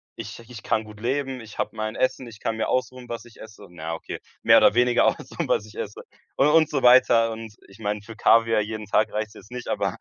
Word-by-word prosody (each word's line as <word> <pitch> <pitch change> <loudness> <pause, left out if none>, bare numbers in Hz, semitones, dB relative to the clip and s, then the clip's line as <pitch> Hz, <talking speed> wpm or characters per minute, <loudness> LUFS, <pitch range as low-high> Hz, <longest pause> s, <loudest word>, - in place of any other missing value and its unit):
ich 110 -1 -8
ich 115 -5 -9
kann 110 - 0
gut 105 0 -13
leben, 130 +2 -2
ich 110 -2 -12
habe - - -3
mein 110 0 -3
Essen, 130 -1 -1
ich 110 -2 -12
kann 115 0 -2
mir 110 - -1
aussuchen, 130 -1 -2
was 115 -1 -6
ich 120 - -17
esse. 105 -2 -12
Na 85 -3 -12
ja, - - -2
okay. 80 - -6 0.2
Mehr - - +7
oder - - +6
weniger 125 0 +3
aussuchen, - - -1
was 105 - +1
ich 105 - -15
esse. 105 - -6 0.3
Und 135 - +4
und 160 0 +4
so 135 -3 -1
weiter. 120 -2 +6
Und, 110 -1 -8
äh, - - -20
ich 100 - -17
meine, 105 -1 -2
für 110 +1 -11
Kaviar 115 0 +4
jeden 110 0 -5
Tag 105 +1 +2
reicht's 110 0 -3
jetzt 105 - -15
nicht, 125 -1 -6
aber - - -1
115 Hz, 250 wpm, -24 LUFS, 105-125 Hz, 0.3 s, Mehr